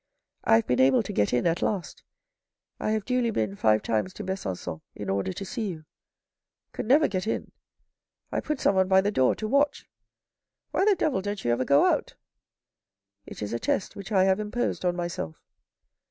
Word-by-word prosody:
" - - -53
I - - +6
have 115 - +3
been 125 +1 0
able 130 0 +5
to - - -6
get 105 -1 +1
in 125 - +1
at 170 0 +1
last. 195 -5 -2 0.8
I - - -1
have 215 -1 0
duly 250 -2 +1
been 110 - -1
five 110 +1 +2
times 115 +11 -1
to 210 - -6
Besancon 95 - -4
in 100 -2 -4
order 95 -1 -1
to 195 - -6
see 220 +2 -3
you. 160 -5 -7 0.9
Could - - -5
never 295 +5 +5
get 185 +1 -3
in. - - -2 0.8
I - - 0
put 300 -3 -3
someone 190 -1 +3
by 190 0 +5
the 205 +2 0
door 130 -10 +3
to 215 - -4
watch. 280 +4 +1 0.8
Why 380 - +2
the 415 -1 +5
devil 295 - 0
don't 205 -3 -4
you 120 - +2
ever 125 +2 +1
go 140 +1 +5
out? - - 0 0.4
" - - -65
" 100 +1 -58
It - - -7
is 105 - -4
a 120 - -1
test 190 - -1
which 200 +1 -8
I 190 -3 +4
have 190 +1 +3
imposed 215 +1 -2
on 175 0 +1
myself." 175 - -4
185 Hz, 205 wpm, -27 LUFS, -, 0.9 s, I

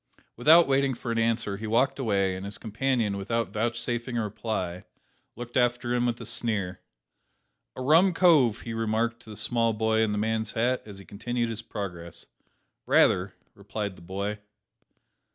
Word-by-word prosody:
Without 160 +8 +6
waiting 135 -1 +2
for 115 - -5
an 115 - 0
answer 115 -3 0
he 110 +2 -6
walked 130 +6 +2
away, 100 -6 +1
and 95 - -7
his 100 +1 -4
companion, 115 -2 -1
without 105 0 -2
vouchsafing 120 +2 -2
a 115 - 0
reply, 95 -4 -4 0.5
looked 120 0 -8
after 120 -1 +1
him 125 0 +1
with 120 -1 -2
a - - -7
sneer. 100 -6 -1 0.9
"A 130 - -5
rum 165 +8 +5
cove!" 155 - +4
he 115 - -6
remarked 115 +1 -1
to 115 - -16
the 105 - -7
small 115 -2 +2
boy 110 0 +1
in 110 -1 +1
the 105 - -1
man's 110 +1 -1
hat, 125 +3 +1
as 100 -2 -10
he 100 - -12
continued 120 +3 -3
his 115 0 -5
progress. 85 -7 -7 0.6
"Rayther," 90 +1 +3 0.2
replied 105 -3 -5
the - - -16
boy. 100 +4 -4
115 Hz, 170 wpm, -27 LUFS, 105-120 Hz, 0.9 s, Without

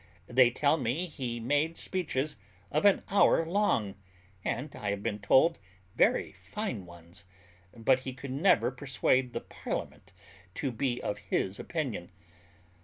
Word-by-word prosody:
They 125 0 +5
tell 145 +5 +2
me 135 +6 -1
he 125 -8 -4
made 145 +7 0
speeches 155 -6 -1 0.4
of 150 +5 +1
an 200 - +5
hour 195 -4 +4
long, 160 - +1 0.5
and, 135 +4 -3
I 105 - -3
have 100 0 -2
been 105 -2 -2
told, 130 +11 +4 0.4
very - - +3
fine 95 - -5
ones; 85 +1 -13 0.5
but 125 +3 +3
he 130 0 -5
could 130 +1 -8
never 145 0 +3
persuade 130 -1 +1
the - - -3
parliament - - -6 0.4
to 135 - -2
be 125 +1 -1
of 105 0 -2
his 100 -1 -2
opinion. 130 - -3
130 Hz, 140 wpm, -30 LUFS, 105-150 Hz, 0.5 s, They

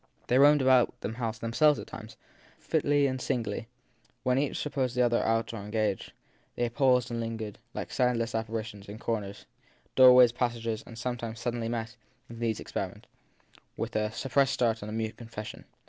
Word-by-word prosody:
They 125 - +3
roamed 145 0 +6
about 130 -2 +4
the - - -3
house 115 -2 -3
themselves 130 +7 +3
at - - -6
times, 110 0 -10 0.4
fitfully 145 -2 +1
and 130 -1 -1
singly, 115 -2 -2 0.6
when 125 0 +2
each 145 0 -1
supposed 135 -4 -2
the 125 - +3
other 120 -1 +2
out 115 +1 0
or - - -4
engaged; 105 -1 -2 0.4
they 120 - 0
paused 125 -2 +3
and 115 - -2
lingered, 115 -2 -5 0.2
like - - -5
soundless 120 -2 +1
appari 110 0 -2
tions, 105 -2 -11
in 105 - -7
corners, 105 -4 -4 0.5
doorways, 125 -2 +8
passages, 115 -2 -2
and 115 - -10
sometimes 115 -2 -4
sud 120 0 -2
denly 115 -1 -3
met, 115 0 -4 0.3
in 115 - -9
these 115 -2 -1
experiments, - - -5 0.7
with - - -4
a 105 0 0
suppressed 135 +3 +1
start 115 -2 +1
and 105 - -6
a - - -5
mute 110 0 -3
confession. 115 -2 -8
115 Hz, 180 wpm, -29 LUFS, 110-125 Hz, 0.7 s, doorways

